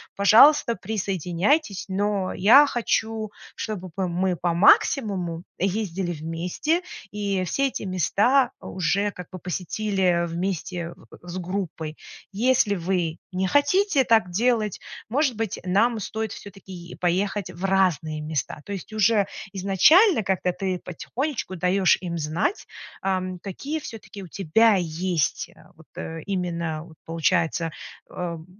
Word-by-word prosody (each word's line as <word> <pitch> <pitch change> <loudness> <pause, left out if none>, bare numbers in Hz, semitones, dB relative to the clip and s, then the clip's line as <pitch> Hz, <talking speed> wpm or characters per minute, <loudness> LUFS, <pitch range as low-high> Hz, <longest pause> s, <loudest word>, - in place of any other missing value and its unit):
пожалуйста, 235 +5 +6
присоединяйтесь. 195 - -1
Но 195 0 -1
я 245 +10 +7
хочу, 225 -4 -1 0.2
чтобы 190 -4 -5
п 190 -1 -1
мы 180 +1 0
по 175 0 0
максимуму 180 - +3 0.2
ездили 190 -2 -1
вместе, 170 - -2 0.3
и 200 -2 -1
все 275 +10 0
эти 265 - -5
места 210 +8 +2
уже 195 +3 -1
как 180 -3 -10
бы 185 - -7
посетили 180 0 0
вместе 170 0 -3 0.2
в 175 - -15
с 175 +1 -5
группой. 175 -4 -4 0.4
Если 220 -1 +2
вы 175 -2 -1 0.2
не 185 +1 0
хотите 285 - +3
так 220 -6 +3
делать, 220 0 +1 0.3
может 270 +1 +1
быть, 220 -2 -3
нам 220 +5 +2
стоит 220 +1 -4
все-таки 195 -2 -11
е 175 -1 -9
поехать 185 +1 -1
в 180 +2 -5
разные 175 -5 +1
места." 150 -1 -3
То - - -8
есть 195 +2 -7
уже 215 -1 +3 0.3
изначально 220 - +5
как-то 185 -1 0
ты 190 -1 0
потихонечку 240 - -4
даешь 185 +1 +3
им 175 -2 -4
знать, 160 - -1 0.3
ам, 185 -1 -2
какие 275 - -5
все-таки 225 -7 -9
у - - -9
тебя 200 +6 +3
есть 175 -2 -1 0.3
вот, - - -19
э, 165 0 -6
именно, 170 -5 -2
вот 165 -1 -15
получается, 165 0 0 0.4
э, - - -17
в 170 -2 -5
190 Hz, 130 wpm, -24 LUFS, 175-220 Hz, 0.4 s, я